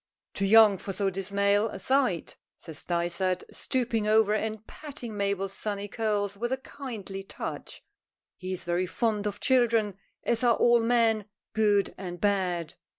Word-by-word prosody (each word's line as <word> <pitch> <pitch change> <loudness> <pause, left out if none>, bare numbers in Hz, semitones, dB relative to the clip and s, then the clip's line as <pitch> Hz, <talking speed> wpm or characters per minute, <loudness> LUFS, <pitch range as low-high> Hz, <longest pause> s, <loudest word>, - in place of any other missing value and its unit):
"Too 195 - 0
young 215 -2 +7
for 195 - -5
so 195 0 0
dismal 200 +3 +1
a - - -7
sight," 260 - 0 0.2
says 160 -2 -10
Dysart, 175 +1 -1
stooping 235 -4 -1
over 215 -1 +4
and 220 0 -2
patting 270 -7 -8
Mabel's 200 -1 -1
sunny 205 -1 -4
curls 205 -2 -1
with 240 +4 -3
a 260 - +1
kindly 225 -8 -7
touch. 195 - -7 0.5
He 185 0 -6
is 185 - -3
very 175 +1 0
fond 210 +1 0
of 205 - -4
children, 230 -6 +2 0.2
as 235 +1 0
are 235 -2 +5
all 240 -1 +4
men, 225 -2 +2 0.3
good 205 -3 +2
and 175 -2 -6
bad. 180 -4 0
205 Hz, 150 wpm, -28 LUFS, 195-225 Hz, 0.5 s, young